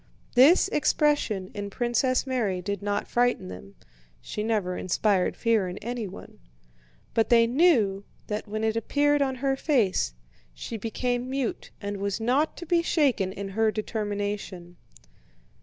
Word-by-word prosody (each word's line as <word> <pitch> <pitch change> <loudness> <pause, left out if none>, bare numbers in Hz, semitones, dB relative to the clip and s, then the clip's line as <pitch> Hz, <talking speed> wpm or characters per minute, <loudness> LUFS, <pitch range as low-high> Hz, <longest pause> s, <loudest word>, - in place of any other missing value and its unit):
This 285 +11 +6
expression 290 - +1
in 205 -1 -5
Princess 245 +5 0
Mary 230 -8 -1
did 200 +3 -4
not 205 0 -2
frighten 245 - +1
them 95 +2 -10 0.4
(she 210 - -5
never 210 -5 -1
inspired 185 +1 +1
fear 225 -5 +2
in 180 - -7
anyone), 225 -3 -6 0.7
but 225 - +2
they 230 -1 +6
knew 230 - +3 0.2
that 210 +1 -4
when 215 +1 -3
it 220 0 +1
appeared 290 +5 +2
on 265 -1 +1
her 270 0 +2
face, 220 - +1 0.4
she 225 - -6
became 245 +3 -2
mute 265 -3 -3
and 205 0 -4
was 200 +1 -2
not 260 +7 +1
to 345 - -7
be 340 +1 +2
shaken 275 - +1
in 195 0 -6
her 220 +3 +2
determination. 205 -5 -4
220 Hz, 140 wpm, -26 LUFS, 200-255 Hz, 0.7 s, This